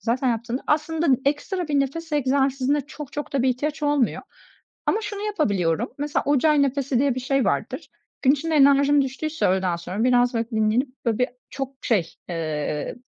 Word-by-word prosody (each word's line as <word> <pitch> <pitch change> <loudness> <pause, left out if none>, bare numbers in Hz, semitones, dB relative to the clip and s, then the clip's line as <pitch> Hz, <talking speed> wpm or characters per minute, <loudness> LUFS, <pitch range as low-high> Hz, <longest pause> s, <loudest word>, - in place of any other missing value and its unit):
zaten 245 +5 0
yaptığında 235 +2 -3
aslında 315 +2 0 0.2
ekstra 335 +5 -1
bir 285 -2 +2
nefes 320 +4 -3
egzersizine 275 0 +1
çok 290 0 -10
çok 295 - -5
da 270 - +2
bir 260 - +3
ihtiyaç 295 +5 -3
olmuyor 290 -5 +1 0.6
ama 440 - +1
şunu 415 -1 -5
yapabiliyorum. 210 - 0
Mesela 290 +1 -1
Ujjayi 290 +1 +4
Nefesi 275 -2 0
diye 275 -2 +2
bir - - -2
şey 270 +1 0
vardır. - - -2 0.3
Gün 265 - +5
içinde 310 +3 -1
enerjim 280 0 +5
düştüyse 295 +4 -2
öğleden 185 -1 +1
sonra 180 +5 -4
biraz, 245 0 +3
böyle, 230 -1 -2
dinlenip, 220 +4 +1 0.2
böyle, 225 -2 +1 0.3
birçok 270 -1 -4
şey, 195 -9 0
eee, 155 -3 -3
270 Hz, 165 wpm, -23 LUFS, 235-295 Hz, 0.6 s, Gün